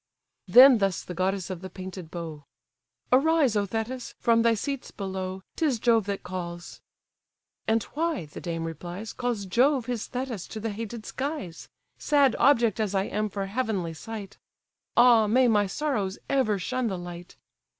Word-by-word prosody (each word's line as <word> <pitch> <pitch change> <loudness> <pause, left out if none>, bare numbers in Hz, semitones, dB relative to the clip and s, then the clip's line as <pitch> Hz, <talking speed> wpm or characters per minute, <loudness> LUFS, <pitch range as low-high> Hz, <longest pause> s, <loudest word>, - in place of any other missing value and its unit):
Then 255 -1 +9
thus 195 -3 0
the 180 - -7
goddess 190 +1 -1
of 180 -2 -6
the 190 - -7
painted 185 -2 -8
bow: 160 -4 -7 0.7
"Arise, 280 -2 +4
O 205 -1 +1
Thetis! 230 +5 -4
from 230 -1 +3
thy 230 0 +4
seats 275 +5 -4
below, 190 -1 -5
'Tis 295 -7 +1
Jove 225 -2 +2
that 200 -1 -3
calls."—"And 180 +4 -6
why 320 - -1
(the 150 - -10
dame 165 -2 -3
replies) 175 +6 -6
Calls 245 -5 -2
Jove 250 +6 +2
his 240 -3 -3
Thetis 245 -7 -4
to 220 - -7
the 225 0 -3
hated 225 +1 -6
skies? 270 - -5 0.3
Sad 285 -4 +3
object 235 -5 +4
as 205 -2 -1
I 190 - +2
am 210 +1 -2
for 195 0 -3
heavenly 200 -6 -2
sight! 200 +4 -8 0.6
Ah 235 -3 +6
may 250 +4 +4
my 210 -3 +3
sorrows 210 -5 -2
ever 235 -7 +2
shun 255 +6 -2
the 190 -4 -2
light! 175 0 -9
215 Hz, 160 wpm, -27 LUFS, 185-250 Hz, 0.7 s, Then